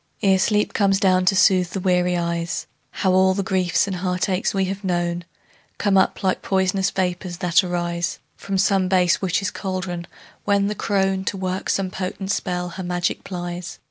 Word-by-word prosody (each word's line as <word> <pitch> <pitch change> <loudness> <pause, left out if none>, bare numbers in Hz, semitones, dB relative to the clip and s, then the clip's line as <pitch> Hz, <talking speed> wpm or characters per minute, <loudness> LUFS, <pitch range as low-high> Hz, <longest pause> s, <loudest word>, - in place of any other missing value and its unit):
Ere 190 -1 +4
sleep 210 +2 +1
comes 195 -2 +2
down 185 -2 +3
to 195 - +4
soothe 185 -2 +4
the 195 - -2
weary 180 -1 +2
eyes, 170 0 -2 0.2
How 190 - 0
all 190 0 +4
the 200 - -1
griefs 185 -1 +1
and 195 -2 -3
heartaches 185 +1 0
we 195 -1 0
have 195 +2 -5
known 175 -2 -1 0.5
Come 200 -1 +1
up 190 - +2
like 185 -1 +1
pois'nous 190 0 +1
vapors 180 -1 -2
that 175 +2 +3
arise 175 0 -2 0.2
From 195 -1 -3
some 195 -1 +2
base 180 -2 +3
witch's 190 +1 0
caldron, 185 -3 -4 0.4
when 200 -1 +2
the 205 - 0
crone, 195 -2 0
To 195 - -2
work 185 0 -3
some 190 -2 0
potent 190 +1 -4
spell, 180 -3 -2
her 185 +2 -7
magic 175 0 -2
plies. 175 -1 -6
185 Hz, 175 wpm, -22 LUFS, 180-195 Hz, 0.5 s, Ere